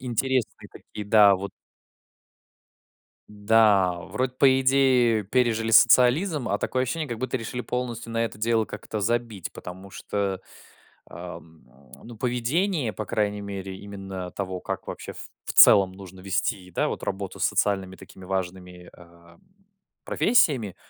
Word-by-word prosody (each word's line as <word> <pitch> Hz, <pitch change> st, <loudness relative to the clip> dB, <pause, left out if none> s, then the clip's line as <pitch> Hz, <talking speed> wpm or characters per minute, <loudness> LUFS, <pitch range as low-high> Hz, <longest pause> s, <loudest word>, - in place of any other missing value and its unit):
интересные 130 Hz, 0 st, -2 dB
такие, 105 Hz, -, -9 dB
да, 105 Hz, -1 st, +6 dB
вот. 100 Hz, +1 st, -6 dB, 1.8 s
Да, 105 Hz, -3 st, +3 dB, 0.2 s
вроде 130 Hz, 0 st, -2 dB
по 135 Hz, -1 st, +5 dB
идее 130 Hz, -4 st, +3 dB
пережили 115 Hz, 0 st, 0 dB
социализм, 125 Hz, -, +4 dB
а -, -, +1 dB
такое 130 Hz, -, -1 dB
ощущение, 155 Hz, +4 st, -2 dB
как 120 Hz, -2 st, -6 dB
будто 130 Hz, +1 st, -2 dB
решили 125 Hz, +2 st, -5 dB
полностью 120 Hz, -2 st, -4 dB
на 115 Hz, 0 st, 0 dB
это 105 Hz, -, -8 dB
дело 115 Hz, 0 st, +1 dB
как-то 105 Hz, 0 st, -6 dB
забить, 115 Hz, -3 st, -2 dB
потому 95 Hz, +2 st, -10 dB
что, 100 Hz, -2 st, -3 dB, 0.7 s
ам, 85 Hz, -2 st, -11 dB, 0.4 s
ну, 115 Hz, -1 st, -11 dB
поведение, 125 Hz, -, -1 dB
по 110 Hz, -, -5 dB
крайней 105 Hz, -1 st, -1 dB
мере 95 Hz, -1 st, -6 dB
именно 95 Hz, -2 st, -8 dB
того, 95 Hz, -2 st, -5 dB
как, -, -, -6 dB
вообще, -, -, -7 dB
в -, -, -11 dB, 0.3 s
в -, -, -4 dB
целом 95 Hz, -2 st, +7 dB
нужно 95 Hz, -1 st, -12 dB
вести, 95 Hz, -1 st, -2 dB
да, -, -, 0 dB
вот, -, -, -1 dB
вот -, -, -14 dB
работу 95 Hz, -1 st, -5 dB
с -, -, -1 dB
социальными 95 Hz, -2 st, 0 dB
такими 95 Hz, -, -14 dB
важными, 90 Hz, -1 st, -5 dB
а, 85 Hz, -1 st, -18 dB, 0.7 s
профессиями, 140 Hz, -, +2 dB
105 Hz, 140 wpm, -25 LUFS, 95-125 Hz, 1.8 s, целом